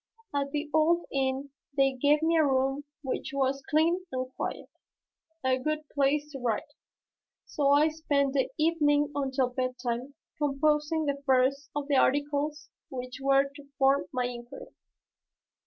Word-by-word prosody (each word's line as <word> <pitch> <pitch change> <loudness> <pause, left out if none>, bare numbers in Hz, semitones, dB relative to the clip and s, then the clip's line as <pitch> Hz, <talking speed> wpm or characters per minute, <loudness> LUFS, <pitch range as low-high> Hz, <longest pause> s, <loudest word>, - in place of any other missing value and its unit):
At 280 -1 0
the 295 +1 -2
old 330 +2 +3
inn 270 +1 -1 0.3
they 270 -1 +4
gave 290 +4 +2
me 330 +1 +3
a 320 - +5
room 270 +1 +1 0.2
which 265 0 -3
was 275 0 +1
clean 330 +4 +2
and 255 0 -4
quiet, - - -4 0.8
a 260 0 +2
good 305 +2 -2
place 290 +1 +1
to 270 - -7
write, 245 +3 -2 0.7
so 285 -2 0
I 290 +2 +5
spent 285 -3 0
the 265 -2 +1
evening 295 -2 +2
until 265 -2 0
bedtime 255 +1 -3 0.2
composing 300 +2 +1
the 280 -1 -2
first 265 +2 +2
of 290 -1 -2
the 285 -2 +3
articles 290 +2 0 0.2
which 255 0 -6
were 275 0 +4
to 285 0 -14
form 270 +1 +3
my 250 -2 -1
inquiry. 245 - -8
280 Hz, 145 wpm, -29 LUFS, 265-300 Hz, 0.8 s, a